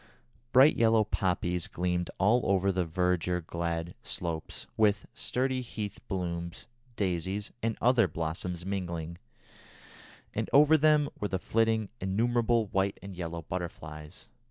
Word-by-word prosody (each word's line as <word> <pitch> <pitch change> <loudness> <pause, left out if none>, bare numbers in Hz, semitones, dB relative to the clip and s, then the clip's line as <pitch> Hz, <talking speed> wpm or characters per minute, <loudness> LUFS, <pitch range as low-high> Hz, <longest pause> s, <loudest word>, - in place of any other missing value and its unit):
Bright 135 +4 +7
yellow 115 -1 +5
poppies 90 -4 0
gleamed 90 0 -1
all 105 +6 +4
over 100 0 +3
the 90 -2 0
verdure 90 +1 +1
clad 85 0 -3
slopes, 85 -2 -5
with 105 -2 +3
sturdy 130 0 -1
heath 110 -4 -5
blooms, 85 -1 -4 0.3
daisies, 95 +1 -2
and 115 0 -1
other 120 -3 +4
blossoms 85 +2 -3
mingling, 85 -4 -4 1.1
and - - -2
over 150 +2 +7
them 150 -1 +4
were 105 - -1
flitting 110 +1 +1
innumerable 115 +3 +2
white 95 0 0
and 100 -1 -8
yellow 85 -1 -5
butterflies. 80 -2 -7
95 Hz, 120 wpm, -30 LUFS, 85-110 Hz, 1.1 s, Bright